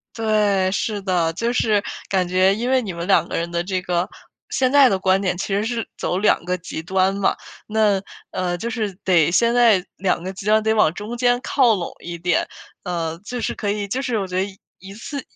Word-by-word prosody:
对， 210 -4 +2
是 205 +1 -2
的。 175 -4 0
就 230 +7 -1
是 215 -4 +2 0.3
感 190 -2 +1
觉 185 +2 +3
因 240 +4 -2
为 260 -1 +3
你 195 -6 -5
们 170 0 -5
两 175 -3 +3
个 - - -5
人 170 +1 -2
的 170 0 0
这 185 0 -2
个 180 -1 -1 0.4
现 255 -1 +1
在 285 -2 +7
的 195 - +2
观 190 0 +2
点 185 -2 -1
其 - - -3
实 200 +2 0
是 230 0 -2
走 180 - -1
两 195 -3 +2
个 180 0 -1
极 165 -2 -6
端 190 +3 +1
嘛。 200 0 +1 0.3
那， 210 -2 +2 0.3
呃， 175 -1 -2
就 235 +6 -4
是 215 -4 -2
得 170 -5 +4
现 235 +7 +3
在 225 -6 +4
两 185 -2 0
个 190 - -4
极 195 +1 -9
端 215 +1 +3
得 220 0 +2
往 175 -7 +3
中 215 +6 -6
间 245 0 +3
靠 255 -4 +3
拢 175 -3 -4
一 175 0 -7
点。 175 +1 0 0.4
呃， 165 -2 -3
就 245 +1 -4
是 - - -1
可 205 - -3
以 205 -1 -2
就 260 +6 -1
是 250 -4 -1
我 200 - -1
觉 185 0 -1
得 195 - -2 0.3
一 195 +1 -11
次 275 +6 -6
195 Hz, 240 characters per minute, -21 LUFS, 180-220 Hz, 0.4 s, 在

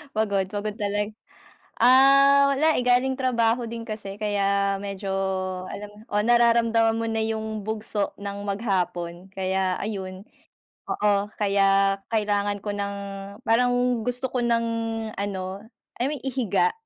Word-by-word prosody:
Pagod, 200 -3 +1
pagod 210 0 -3
talag 205 0 -2 0.7
um, 275 +3 +7
wala, 310 +3 +3
eh, 250 - 0
galing 250 +2 +3
trabaho 240 -2 +2
din 230 0 -6
kasi 210 -2 -6
kaya 200 -1 +1
medyo 200 0 -6 0.6
alam 205 0 -7 0.2
oh, 205 - +2
nararamdaman 230 -1 +3
mo 230 - -2
na 225 0 0
yung 220 -1 -3
bugso 215 -1 -2
ng 200 0 -5
maghapon, 185 -3 -2
kaya 190 -1 -1
ayun. 190 -2 -5 0.7
Oo 205 0 +1
kaya, 195 -1 +3
kailangan 205 -2 0
ko 205 - -2
ng 200 0 -3 0.5
parang 245 +1 +2
gusto 250 +2 -2
ko 250 - +1
ng 230 -1 +2 0.5
ano, 200 -1 -3 0.6
I 250 - +2
mean, 300 - -4
ihiga 265 - +1
215 Hz, 130 wpm, -25 LUFS, 200-235 Hz, 0.7 s, um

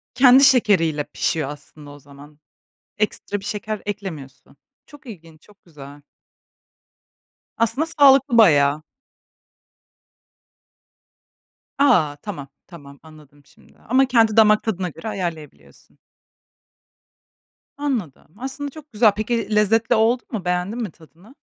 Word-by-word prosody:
Kendi 255 +1 +6
şekeriyle 190 - +3
pişiyor 150 -1 -3
aslında 145 0 -12
o 145 - -13
zaman. 145 +2 -17 0.6
Ekstra 205 -1 -3
bir - - -14
şeker 210 0 -5
eklemiyorsun. 180 -11 -8 0.3
Çok 290 -1 -17
ilginç, 165 -7 -13
çok 205 -1 -24
güzel. 145 -3 -14 1.6
Aslında 230 +7 0
sağlıklı 270 -3 +5
bayağı. 150 -7 +4 3.0
A! 155 - +3
Tamam, 160 -10 -8 0.2
tamam, 140 -5 -14
anladım 150 -2 -19
şimdi. - - -25
Ama 260 +3 +1
kendi 230 -4 +2
damak 215 -1 +5
tadına 190 -5 -3
göre 165 +6 -11
ayarlayabiliyorsun. 175 -7 -8 1.8
Anladım, 225 - -5
aslında 270 +3 -6
çok 305 0 -14
güzel. 215 -1 +3
Peki 220 0 -3
lezzetli 225 +3 +2
oldu 230 +3 +1
mu? 200 -6 -5
Beğendin 180 +7 -2
mi 210 - -5
tadını? 170 - -21
205 Hz, 110 wpm, -20 LUFS, 155-230 Hz, 3.0 s, Kendi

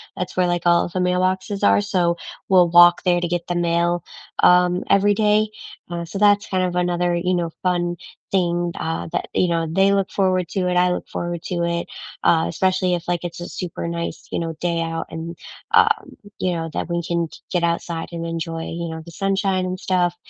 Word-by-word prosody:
That's 180 0 -5
where, 180 - +4
like, 175 -1 -1
all 170 0 +4
of 175 - -7
the 185 - -1
mailboxes 185 +2 0
are, 100 0 +5
so 170 - +1 0.3
we'll 180 -2 +5
walk 175 0 +7
there 175 -1 +3
to 175 - -1
get 175 0 -3
the 175 - -2
mail, 170 0 +1 0.4
um, 180 0 +5
every 205 +1 +4
day. 215 0 +3 0.4
Uh, 170 -1 -4
so 195 +4 -6
that's 205 -1 +4
kind 185 -1 0
of 180 -1 -1
another, 175 0 +1
you 180 +2 0
know, 170 -1 -1
fun 175 -1 0 0.4
thing, 175 -2 +1
uh, 160 +1 -3
that, - - -2
you 180 - +2
know, 165 -1 0
they 195 +4 +3
look 195 -1 0
forward 185 -3 +1
to 185 -2 -1
it, 180 - 0
I 180 0 +4
look - - -3
forward 175 -1 -4
to 175 -1 -2
it, 170 0 -1 0.4
uh, 160 -1 +4
especially 185 +1 +1
if, 175 -1 -7
like, 175 -1 -1
it's 175 0 -6
a 175 - -6
super 175 -2 -5
nice, 170 0 -5
you - - -1
know, 165 -1 -3
day 170 -1 0
out 165 0 -3
and, 165 +1 -6 0.4
um, - - +3 0.2
you 180 -1 0
know, 165 -1 -3
that - - -3
we 170 0 -1
can 170 -1 -1
g - - -13
get 175 -2 0
outside 170 0 -2
and 170 0 -5
enjoy, 165 0 -4
you 170 0 -4
know, 160 0 -6
the 170 - -11
sunshine 195 0 0
and 185 0 -4
stuff. 180 -2 +1
175 Hz, 215 wpm, -21 LUFS, 170-185 Hz, 0.4 s, walk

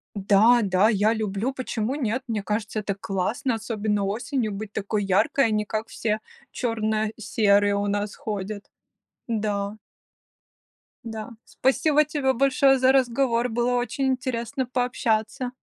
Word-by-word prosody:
Да, 205 +4 +5
да, 195 +1 +3
я 215 0 +3
люблю, 215 +3 -2
почему 255 -1 -2
нет. 255 -2 -1
Мне 215 -4 -2
кажется, 210 0 -2
это 200 -2 -3
классно, 200 +6 -2
особенно 215 -2 -1
осенью 230 +3 -2
быть 205 +1 -6
такой 205 0 -2
яркой, 210 +8 +3
а - - -2
не 210 0 +1
как 220 +2 -3
все 215 -1 -2 0.3
черно-серые 215 -2 +1
у 205 0 -1
нас 205 0 -2
ходят. 205 -1 -5 0.6
Да. 210 -2 -2 1.3
Да. 220 -2 -6 0.2
Спасибо 300 +3 +2
тебе 275 -3 0
большое 270 +1 +4
за 260 0 +4
разговор. 250 -2 +2
Было 240 +2 0
очень 250 +2 -1
интересно 255 -1 -1
пообщаться! 245 -1 -1
220 Hz, 130 wpm, -25 LUFS, 205-250 Hz, 1.3 s, Да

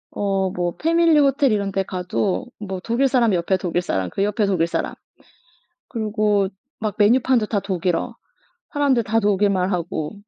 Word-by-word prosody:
어 195 -2 0
뭐 175 -1 -2
패밀리 330 -1 +3
호텔 275 -2 +3
이런 200 -2 0
데 195 - 0
가도 185 +1 -2
뭐 190 -3 -5
독일 240 +4 +1
사람 240 -6 +2
옆에 180 +2 +1
독일 175 -1 -1
사람 95 - -2
그 195 - -1
옆에 210 +1 +1
독일 175 -4 +1
사람 - - -2 1.0
그리고 210 -3 0 0.3
막 215 -3 -2
메뉴판도 235 +1 +3
다 205 -2 -1
독일어 180 -3 -2 0.6
사람들 275 -5 +2
다 225 +2 +1
독일말 200 -2 +1
하고. 170 -2 -3
205 Hz, 300 characters per minute, -21 LUFS, 185-230 Hz, 1.0 s, 패밀리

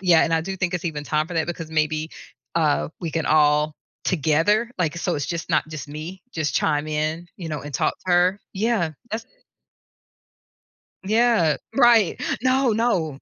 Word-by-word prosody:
yeah, 180 -3 +5
and 165 - -1
I 165 - +3
do 190 +4 -5
think 180 -1 -1
it's 180 0 -3
even 150 -3 -4
time 155 +1 0
for 175 - -6
that 160 0 +1
because 165 -2 -5
maybe, 155 0 0 0.5
uh, 155 -3 +2
we 165 -2 -3
can 160 -1 -2
all 150 0 +3 0.3
together, 185 - +2
like, 170 -2 0
so - - -1
it's 145 - -2
just 170 -2 -4
not 155 -1 +2
just 155 -1 -7
me, 160 +5 -7
just 155 -2 -2
chime 150 -1 +1
in, 155 +3 -2
you 170 -3 -6
know, 150 -3 -3
and 145 0 -8
talk - - +1
to - - -1
her. 180 +3 +3
Yeah, 195 -6 0 0.2
that's 220 +1 -4 1.8
Yeah, 220 -7 +3 0.2
right. 235 -7 +5 0.2
No, 260 +1 +3
no. 185 - 0
165 Hz, 175 wpm, -23 LUFS, 155-190 Hz, 1.8 s, yeah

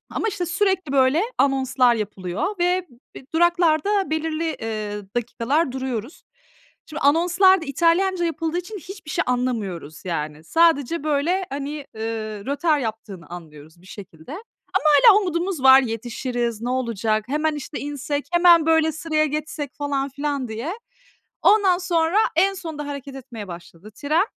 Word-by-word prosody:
Ama, 445 - -2
işte, 360 -4 -3
sürekli, 375 -4 0
böyle, 270 +5 +3 0.2
anonslar 265 -3 +3
yapılıyor 205 - -3
ve 360 +1 +1 0.3
b - - -11
duraklarda 345 +3 +2
belirli, 320 +1 -2
eee, 215 -2 -4
dakikalar 245 +5 0
duruyoruz. 260 0 -5 0.6
Şimdi 310 - -7
anonslar 350 +5 +4
da - - -6
İtalyanca 345 +5 +2
yapıldığı 330 +1 -2
için 400 +4 -6
hiçbir 370 -3 -10
şey 345 0 0
anlamıyoruz 210 - -3
yani. 155 -2 -4
Sadece, 325 - +2
böyle, 325 +6 0
hani, 280 +1 -4 0.2
eee, 220 -2 -5
rötar 295 +2 +1
yaptığını 215 -7 -6
anlıyoruz 160 -1 -12
bir - - -18
şekilde. 170 -5 -12
Ama 370 - -6 0.7
hâlâ 415 - +5
umudumuz 350 -4 -2
var, 265 0 +8
"Yetişiriz, 235 0 -3
ne 245 - -3
olacak? 225 -4 -1
Hemen, 305 +2 0
işte, 290 +1 -6
insek, 290 0 -4
hemen, 345 -2 +6
böyle, 320 -1 +3
sıraya 310 0 0
geçsek." 305 -1 -4
falan 280 -1 -2
filan 280 -1 -3
diye. 235 - -4 0.7
Ondan 390 -4 +5
sonra, 345 0 +1 0.2
en 390 +4 +3
sonunda 315 -6 -6
hareket 280 -1 -7
etmeye 230 -5 -9
başladı 170 +4 -11
tren. 310 +6 +1
285 Hz, 140 wpm, -22 LUFS, 230-335 Hz, 0.7 s, var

